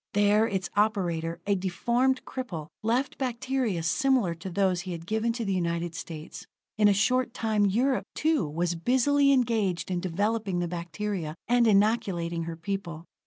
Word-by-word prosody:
There 205 Hz, +2 st, +4 dB
its 190 Hz, -4 st, -3 dB
operator, 175 Hz, -6 st, 0 dB
a 200 Hz, -, +2 dB
deformed 235 Hz, +8 st, 0 dB
cripple, 180 Hz, -, -6 dB
left 240 Hz, +5 st, 0 dB
bacteria 250 Hz, -7 st, -1 dB
similar 245 Hz, +1 st, +2 dB
to 170 Hz, +3 st, -7 dB
those 185 Hz, -1 st, +1 dB
he 185 Hz, -1 st, -5 dB
had 165 Hz, -1 st, -7 dB
given 220 Hz, +4 st, 0 dB
to 230 Hz, -1 st, -3 dB
the 195 Hz, -, 0 dB
United 170 Hz, -1 st, -1 dB
States. 165 Hz, -1 st, -8 dB, 0.3 s
In 210 Hz, -1 st, +4 dB
a -, -, +6 dB
short 245 Hz, +4 st, +1 dB
time 215 Hz, -2 st, +1 dB
Europe, 250 Hz, +6 st, +1 dB
too, 305 Hz, -, +1 dB
was 170 Hz, +3 st, -1 dB
busily 260 Hz, +10 st, +3 dB
engaged 220 Hz, -9 st, +1 dB
in 180 Hz, -, 0 dB
developing 200 Hz, +2 st, -1 dB
the 175 Hz, 0 st, 0 dB
bacteria, 170 Hz, -1 st, -4 dB
and 240 Hz, 0 st, +4 dB
inoculating 195 Hz, -6 st, +1 dB
her 165 Hz, 0 st, -5 dB
people. 170 Hz, -2 st, -5 dB
200 Hz, 160 wpm, -27 LUFS, 170-235 Hz, 0.3 s, a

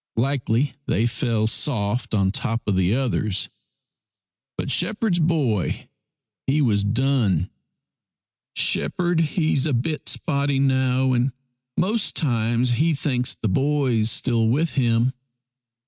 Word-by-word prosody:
Likely 130 Hz, +1 st, +1 dB, 0.2 s
they 110 Hz, -, +1 dB
fell 115 Hz, -2 st, 0 dB
soft 115 Hz, -1 st, -1 dB
on 95 Hz, -2 st, +2 dB
top 115 Hz, +2 st, -3 dB
of 100 Hz, -, +1 dB
the 95 Hz, +3 st, +2 dB
others. 110 Hz, -7 st, -1 dB, 1.1 s
But 140 Hz, -, -2 dB
shepherd's 185 Hz, +2 st, 0 dB
boy 145 Hz, -, 0 dB, 0.6 s
he 140 Hz, +3 st, +2 dB
was 105 Hz, -8 st, +2 dB
done. 110 Hz, -, +1 dB, 0.5 s
" -, -, -67 dB
Shepherd 175 Hz, -3 st, 0 dB
he's 155 Hz, -2 st, +1 dB
a 150 Hz, -, 0 dB
bit 145 Hz, +6 st, -2 dB
spotty 140 Hz, -3 st, 0 dB
now, 130 Hz, -1 st, +2 dB
and 125 Hz, +1 st, +1 dB, 0.4 s
most 210 Hz, +3 st, +1 dB
times 120 Hz, -3 st, +1 dB
he 165 Hz, 0 st, +2 dB
thinks 130 Hz, -3 st, -1 dB
the -, -, -3 dB
boy's 130 Hz, -1 st, +1 dB
still 115 Hz, -1 st, +1 dB
with 150 Hz, +8 st, +1 dB
him. 120 Hz, -1 st, +2 dB
125 Hz, 120 wpm, -23 LUFS, 115-145 Hz, 1.1 s, on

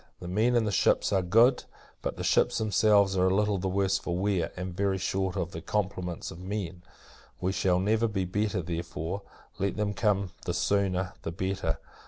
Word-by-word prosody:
The 90 Hz, -, -7 dB
men 110 Hz, +7 st, +2 dB
in 120 Hz, -, +4 dB
the 105 Hz, -, -1 dB
ships 95 Hz, -, +2 dB
are 95 Hz, -, +3 dB
good; 115 Hz, +8 st, +4 dB, 0.4 s
but -, -, -3 dB
the -, -, -4 dB
ships -, -, +3 dB
themselves 100 Hz, -1 st, +3 dB
are 90 Hz, 0 st, +3 dB
a 95 Hz, -, +2 dB
little 105 Hz, -1 st, +1 dB
the 95 Hz, -, -2 dB
worse 95 Hz, 0 st, +1 dB
for 90 Hz, 0 st, -3 dB
wear, 95 Hz, -2 st, 0 dB
and 90 Hz, -1 st, -5 dB
very 95 Hz, 0 st, +1 dB
short 95 Hz, 0 st, -1 dB
of 90 Hz, -3 st, -2 dB
their 80 Hz, -, -6 dB
complements 90 Hz, -2 st, -3 dB
of 80 Hz, -, -10 dB
men. 95 Hz, -2 st, -4 dB, 0.6 s
We 95 Hz, +1 st, 0 dB
shall 90 Hz, -1 st, +2 dB
never 110 Hz, +4 st, +2 dB
be 95 Hz, -3 st, -1 dB
better: 100 Hz, 0 st, -1 dB
therefore, 85 Hz, +2 st, -4 dB, 0.4 s
let 100 Hz, +2 st, -1 dB
them 105 Hz, -1 st, 0 dB
come; 100 Hz, -3 st, +1 dB
the -, -, -1 dB
sooner, 95 Hz, -3 st, +1 dB
the 80 Hz, -, -4 dB
better. 95 Hz, -2 st, -2 dB
95 Hz, 195 wpm, -28 LUFS, 90-105 Hz, 0.6 s, in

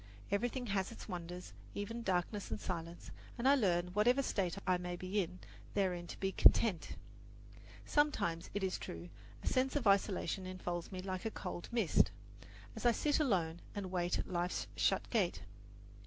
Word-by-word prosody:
Everything 245 Hz, +5 st, 0 dB
has 195 Hz, -2 st, 0 dB
its 230 Hz, -, -9 dB
wonders, 180 Hz, -1 st, -6 dB, 0.2 s
even 230 Hz, +4 st, -3 dB
darkness 190 Hz, 0 st, -1 dB
and 110 Hz, -, -3 dB
silence, 170 Hz, -, -5 dB, 0.3 s
and 240 Hz, +2 st, +1 dB
I 275 Hz, -, +8 dB
learn, 180 Hz, -9 st, +2 dB
whatever 240 Hz, +8 st, +3 dB
state 190 Hz, -7 st, 0 dB
I 185 Hz, -2 st, +3 dB
may 180 Hz, 0 st, -3 dB
be 185 Hz, +3 st, 0 dB
in, 180 Hz, 0 st, -5 dB, 0.4 s
therein 180 Hz, -4 st, 0 dB
to -, -, -8 dB
be 195 Hz, 0 st, 0 dB
content. 195 Hz, -3 st, +4 dB, 0.9 s
Sometimes, 290 Hz, -, +1 dB
it 205 Hz, -, 0 dB
is 190 Hz, -1 st, 0 dB
true, 85 Hz, +1 st, -7 dB, 0.3 s
a -, -, -6 dB
sense 260 Hz, +1 st, +2 dB
of 285 Hz, -5 st, 0 dB
isolation 195 Hz, -1 st, +2 dB
enfolds 175 Hz, -2 st, -4 dB
me 185 Hz, -1 st, -4 dB
like 185 Hz, 0 st, -4 dB
a -, -, +1 dB
cold 180 Hz, -4 st, -6 dB
mist 230 Hz, -7 st, +4 dB, 0.7 s
as -, -, -6 dB
I 240 Hz, -1 st, +5 dB
sit 295 Hz, +5 st, +2 dB
alone 175 Hz, -, +1 dB
and 195 Hz, -3 st, -4 dB
wait 175 Hz, -1 st, +1 dB
at -, -, -3 dB
life's 175 Hz, 0 st, -1 dB
shut -, -, +2 dB
gate. -, -, +1 dB
185 Hz, 170 wpm, -36 LUFS, 175-220 Hz, 0.9 s, I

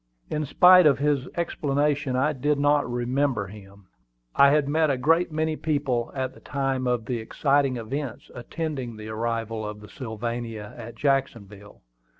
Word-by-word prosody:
In 150 Hz, -1 st, -2 dB
spite 180 Hz, +3 st, +7 dB
of 140 Hz, -, +4 dB
his 140 Hz, -2 st, 0 dB
explanation 145 Hz, -4 st, 0 dB
I 145 Hz, +4 st, +2 dB
did 145 Hz, +2 st, 0 dB
not 145 Hz, -2 st, +2 dB
remember 125 Hz, -2 st, 0 dB
him. 100 Hz, 0 st, -13 dB, 0.5 s
I 140 Hz, -, +7 dB
had 145 Hz, 0 st, +2 dB
met 155 Hz, +1 st, +2 dB
a 135 Hz, -, +1 dB
great 165 Hz, +6 st, +2 dB
many 155 Hz, 0 st, -1 dB
people 140 Hz, -7 st, -1 dB
at 130 Hz, -1 st, -2 dB
the -, -, -16 dB
time 135 Hz, -2 st, -2 dB
of 120 Hz, -2 st, 0 dB
the 120 Hz, -1 st, -2 dB
exciting 135 Hz, +3 st, +1 dB
events 125 Hz, +2 st, -5 dB
attending 130 Hz, -2 st, -5 dB
the 110 Hz, 0 st, -8 dB
arrival 115 Hz, 0 st, -3 dB
of 105 Hz, 0 st, -6 dB
the 105 Hz, -, -13 dB
Sylvania 115 Hz, -3 st, -5 dB
at 120 Hz, -1 st, -9 dB
Jacksonville. 110 Hz, -7 st, -2 dB
130 Hz, 155 wpm, -25 LUFS, 115-145 Hz, 0.5 s, spite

